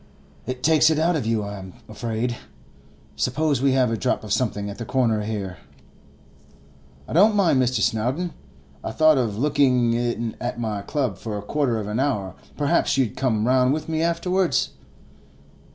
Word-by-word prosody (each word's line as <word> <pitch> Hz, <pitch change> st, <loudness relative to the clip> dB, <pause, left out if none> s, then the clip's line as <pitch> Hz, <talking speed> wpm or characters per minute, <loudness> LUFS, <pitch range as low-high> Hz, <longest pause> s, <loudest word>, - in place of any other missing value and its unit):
'It 130 Hz, 0 st, -5 dB
takes 155 Hz, 0 st, +5 dB
it 160 Hz, -, +1 dB
out 165 Hz, +2 st, +2 dB
of 135 Hz, -8 st, -2 dB
you, 115 Hz, -2 st, 0 dB
I'm 100 Hz, -2 st, -7 dB
afraid. 115 Hz, +2 st, -3 dB, 0.8 s
Suppose 140 Hz, -, 0 dB
we 135 Hz, -1 st, +3 dB
have 130 Hz, -3 st, +2 dB
a 115 Hz, -, -1 dB
drop 125 Hz, +1 st, -1 dB
of 105 Hz, -2 st, -2 dB
something 105 Hz, -5 st, -1 dB
at 100 Hz, +2 st, -7 dB
the -, -, -3 dB
corner 115 Hz, -3 st, +1 dB
here?' 100 Hz, -4 st, -4 dB, 1.5 s
'I -, -, -6 dB
don't 205 Hz, +6 st, +5 dB
mind, 170 Hz, -10 st, +3 dB
Mr. 130 Hz, 0 st, +1 dB
Snowdon. 130 Hz, +11 st, 0 dB, 0.5 s
I 110 Hz, -, -4 dB
thought 155 Hz, 0 st, +5 dB
of 110 Hz, -5 st, -1 dB
looking 130 Hz, -3 st, +2 dB
in 120 Hz, -1 st, -2 dB
at 120 Hz, 0 st, -3 dB
my 110 Hz, -3 st, -2 dB
club 125 Hz, -, -2 dB
for 110 Hz, -2 st, -4 dB
a 100 Hz, -, -6 dB
quarter 130 Hz, 0 st, 0 dB
of 105 Hz, -, -3 dB
an 105 Hz, +3 st, -2 dB
hour; 105 Hz, -10 st, -1 dB, 0.2 s
perhaps 145 Hz, -2 st, +1 dB
you'd 130 Hz, -6 st, +1 dB
come 115 Hz, -5 st, 0 dB
round 130 Hz, +1 st, +3 dB
with 155 Hz, -, -3 dB
me 160 Hz, -1 st, -1 dB
afterwards? 170 Hz, -2 st, +1 dB
125 Hz, 170 wpm, -23 LUFS, 110-145 Hz, 1.5 s, takes